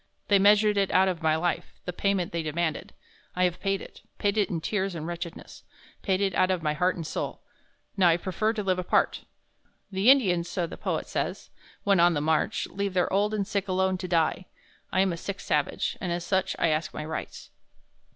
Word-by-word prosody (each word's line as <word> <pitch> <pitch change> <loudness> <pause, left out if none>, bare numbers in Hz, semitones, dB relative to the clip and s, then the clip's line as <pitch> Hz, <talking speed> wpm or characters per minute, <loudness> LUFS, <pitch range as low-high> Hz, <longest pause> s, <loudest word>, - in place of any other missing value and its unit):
They 200 -1 +5
measured 210 +1 +5
it 195 -1 +2
out 190 +1 +4
of 180 -3 -2
my 160 -1 +3
life, 175 +2 -2
the 180 - -4
payment 195 -1 0
they 170 - -2
demanded. 160 +1 -2 0.4
I 180 - +1
have 180 -1 +1
paid 195 -1 -1
it - - -13 0.2
paid 200 0 0
it 210 -3 +2
in 170 - -2
tears 190 +2 -2
and 155 -1 -5
wretchedness 170 0 -7 0.4
paid 190 -1 0
it 195 -2 +1
out 185 - +3
of 185 -3 0
my 150 -1 +1
heart 180 +4 +1
and 165 - -5
soul. - - -4 0.5
Now 190 -3 +4
I 165 - +4
prefer 190 +5 -1
to 215 -2 -3
live 185 -2 +1
apart.... 180 - +1 0.7
The 195 +5 +3
Indians, 180 -11 +4
so 175 -1 -1
the - - -8
poet - - -2
says, - - -3 0.3
when 200 -3 +3
on 175 0 +5
the - - +1
march, 155 +1 +1
leave 200 -1 -3
their 180 - +1
old 205 +2 +2
and 210 -2 -1
sick 200 0 -2
alone 185 0 +1
to 185 - -4
die. 170 +1 +1 0.4
I 185 - +3
am 190 -2 +2
a - - -5
sick 200 +3 -5
savage, - - -1
and 180 -3 -2
as 175 0 -2
such, 190 0 0
I 165 - +2
ask 155 +1 -1
my 150 - -4
rights." 160 +1 -6
185 Hz, 215 wpm, -27 LUFS, 170-195 Hz, 0.7 s, They